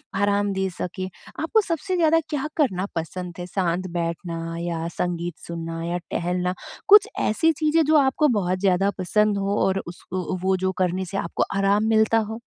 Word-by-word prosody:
आराम 205 0 +2
दे 190 0 -1
सकें, 185 +1 -5 0.3
आपको 380 +8 +3
सबसे 370 0 -2
ज़्यादा 325 -2 +4
क्या 295 -2 -2
करना 195 - +1
पसंद 175 +2 -4
है? 175 - -4
शांत 180 0 -1
बैठना 165 -1 -3
या 170 -1 -3
संगीत 175 -1 -2
सुनना 165 -1 -5
या 170 +1 -1
टहलना, 180 +1 -1 0.3
कुछ 415 +1 +8
ऐसी 320 +10 +2
चीज़ें 315 +1 +2
जो 310 +2 +3
आपको 280 +2 +3
बहुत 185 -7 0
ज़्यादा 195 0 +3
पसंद 210 +2 +2
हो 200 +1 0
और 190 0 +1
उसको 185 +1 -4
वो 190 +1 +2
जो 185 0 0
करने 185 0 0
से 195 +2 -5
आपको 170 - -1
आराम 200 +1 +3
मिलता 220 0 +4
हो? 220 0 -2
190 Hz, 170 wpm, -24 LUFS, 175-220 Hz, 0.3 s, कुछ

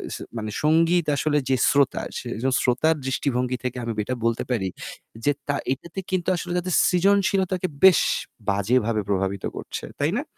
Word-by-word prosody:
স - - -5 0.2
মানে 110 -1 -4
সঙ্গীত 165 +2 +3
আসলে 150 +1 +1
যে 135 - +4
শ্রোতা, 140 -1 +2 0.2
সে - - -6
একজন 130 +4 -1
শ্রোতার 140 +6 +2
দৃষ্টিভঙ্গি 125 -1 -1
থেকে 125 0 -3
আমি 115 - -2
এটা 130 - -2
বলতে 115 0 +1
পারি 105 -6 0 0.6
যে, 145 - +5 0.2
তা 145 - +1 0.2
এটাতে 170 +7 -8
কিন্তু 185 -2 -1
আসলে 175 0 -5
তাদের 180 0 -3
সৃজনশীলতাকে 190 0 +2 0.2
বেশ 190 -2 +8 0.5
বাজেভাবে 110 +2 +1
প্রভাবিত 95 0 -1
করছে, - - -6 0.2
তাই - - +2
না? - - -3
140 Hz, 160 wpm, -24 LUFS, 120-175 Hz, 0.6 s, বেশ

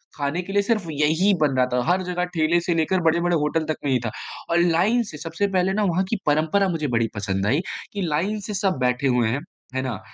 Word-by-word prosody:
खाने 145 +4 -2
के 195 +2 -7
लिए 205 - +4
सिर्फ 215 -4 0
यही 160 +7 +2
बन 140 -3 +2
रहा 125 - +4
था, 125 - +2
हर 185 +1 +3
जग़ह 180 0 -2
ठेले 165 +2 +3
से 170 0 0
लेकर, 170 +3 +1
बड़े-बड़े 170 +2 +2
होटल 155 +2 0
तक 155 - +1
में 135 - +1
ही 125 - +3
था 110 - -2 0.4
और 170 - +3
लाइन 180 +8 +3
से 150 - -8
सबसे 165 +6 -2
पहले 190 0 +1
ना 210 +1 +1
वहाँ 185 +1 +1
की 225 - +1
परँपरा 160 +6 +2
मुझे 155 -4 -1
बड़ी 115 0 +2
पसंद 100 -1 -2
आई 140 +8 +2 0.3
कि 200 - -3
लाइन 180 +6 -1
से 210 - -4
सब 190 -5 0
बैठे 125 +2 +1
हुए 125 -3 +2
हैं। 130 - -1 0.4
हैं 130 - 0
ना? 120 -7 -3
165 Hz, 245 wpm, -23 LUFS, 140-185 Hz, 0.4 s, लिए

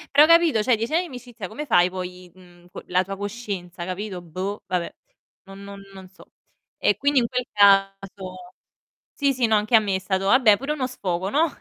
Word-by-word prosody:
Però 300 +2 +8
capito, 335 -9 +4
cioè 245 +1 +2
10 230 +7 -4
anni 340 - +3
i - - -6
amicizia 245 - -9
come 270 +10 -7
fai 180 -7 +3
poi, 180 -1 -8
mhmm, 175 -1 -19
co - - -9
la 180 +1 +1
tua 195 +1 -7
coscienza, 200 -5 -6
capito, 185 0 -5
boh, 185 +5 -5
vabbè, 180 -2 -2 0.5
non 195 +1 -12
non 200 0 -10
non 190 -1 -12
so. 190 - -20 0.5
E 205 - +2
quindi 285 +2 +1
in 235 -2 +3
quel 250 0 -2
caso 195 -2 +1 0.6
sì, 280 -1 +1
sì, 245 -2 0
no, 220 - +3
anche 210 +3 +2
a - - +8
me 200 -3 -2
è - - -1
stato 190 0 -2
vabbè 220 -3 +5
pure 275 +4 -3
uno 270 -4 -2
sfogo, 190 -7 -3
no? 320 +4 +3
200 Hz, 205 wpm, -23 LUFS, 185-245 Hz, 0.6 s, Però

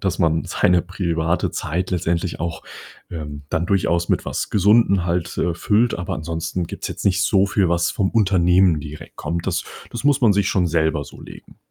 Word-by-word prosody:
dass 95 -2 -1
man 80 -2 +1
seine 90 0 +2
private 85 -2 -1
Zeit 90 +5 -3
letztendlich 85 -1 -1
auch, 85 +1 -4 0.5
ähm, 75 -3 -7
dann 85 +2 0
durchaus 85 -3 +1
mit - - +1
was - - -3
Gesunden 100 -2 +3
halt, 85 -1 -2
äh, 85 - 0
füllt, 110 +7 +1
aber 90 +2 -3
ansonsten 80 +3 -3
gibt's - - -6
jetzt - - -7
nicht 95 -1 +2
so 95 0 +3
viel, 100 -2 +1
was 85 0 +1
vom 95 - 0
Unternehmen 95 -5 +3
direkt 75 +1 -10
kommt. 85 +2 -4
Das - - -1 0.3
das 120 - -6
muss 145 -1 +3
man 110 -4 +6
sich 100 -1 +1
schon 90 -2 +1
selber 80 -3 0
so - - -13
legen. - - -13
90 Hz, 190 wpm, -21 LUFS, 85-95 Hz, 0.5 s, man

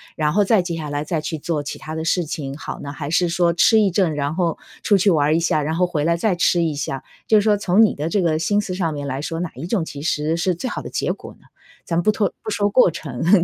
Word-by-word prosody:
然 150 -1 +1
后 205 +1 +4
再 210 -1 +4
接 175 -1 -4
下 155 -2 -5
来 145 0 -2
再 160 +1 -2
去 155 +1 -4
做 155 0 -2
其 145 - -6
它 155 +1 -7
的 160 - -3
事 175 +1 +1
情 145 -4 -5
好 - - -7
呢？ 140 - -6
还 145 -1 -5
是 175 +2 +2
说 170 0 +2
吃 175 +7 +5
一 200 - +2
阵， 175 -4 +1
然 145 0 -1
后 170 -2 0 0.3
出 205 - +4
去 195 +1 +3
玩 145 -4 +3
儿 155 - +3
一 - - +3
下， 160 -2 +1
然 155 +2 -2
后 180 +2 +3
回 165 -5 -2
来 170 - +2
再 205 +3 +1
吃 175 0 +2
一 160 -2 0
下， 140 -2 -4 0.2
就 215 - +5
是 - - +2
说 210 -2 +3
从 200 +2 +4
你 215 - +3
的 150 +2 -3
这 200 +3 +1
个 160 -3 +1
心 205 +6 +1
思 195 -3 -5
上 170 -4 -1
面 145 -1 -5
来 135 0 -3
说， 165 +2 -4
哪 175 - -4
一 145 +7 -6
种 190 -2 0
其 140 -3 -8
实 155 +1 0
是 180 0 0
最 250 +9 -4
好 - - -4
的 - - -8
结 - - -1
果 - - -11
呢？ - - -23 0.4
咱 170 0 0
不 195 - +1
脱 205 -2 0
不 220 - -4
说 205 -1 +1
过 230 -1 +5
程， 160 +6 +1
165 Hz, 315 characters per minute, -21 LUFS, 150-185 Hz, 0.4 s, 吃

